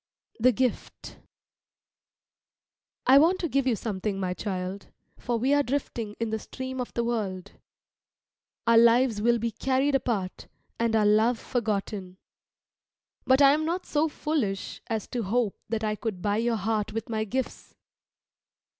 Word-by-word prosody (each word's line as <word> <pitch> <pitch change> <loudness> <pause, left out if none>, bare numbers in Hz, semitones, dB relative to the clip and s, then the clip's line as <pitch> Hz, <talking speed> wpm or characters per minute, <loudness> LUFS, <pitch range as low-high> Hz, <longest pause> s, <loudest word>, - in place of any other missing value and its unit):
THE 250 +3 +5
GIFT 250 0 -3 1.9
I 270 +2 +7
want 340 +5 +4
to 350 - -2
give 275 -3 0
you 245 - +3
something, 200 -2 -3
my 185 -1 -1
child, 190 0 -4 0.3
for 240 -1 -1
we 260 +5 +2
are 290 - +4
drifting 240 -6 -3
in 230 -1 -2
the 220 - -1
stream 260 +3 -6
of 245 - -5
the 235 - +1
world. 200 -5 -3 1.1
Our 230 -1 +6
lives 235 -1 +4
will 235 +2 +3
be 230 0 -2
carried 265 +5 0
apart, 220 -8 -2 0.3
and 230 -1 +1
our 215 -1 +3
love 220 +3 +4
forgotten. 205 -6 -3 1.1
But 260 +2 +5
I 275 - +8
am 310 +1 0
not 345 +3 -2
so 310 +1 +1
foolish 275 -11 -2
as 220 -3 -2
to 245 - -2
hope 220 +1 0
that 225 0 -2
I 215 -1 0
could 215 -4 -4
buy 205 +3 0
your 230 +1 +1
heart 215 +1 -1
with 225 0 -4
my 220 -1 -1
gifts. 255 +5 -4
230 Hz, 155 wpm, -27 LUFS, 210-260 Hz, 1.9 s, I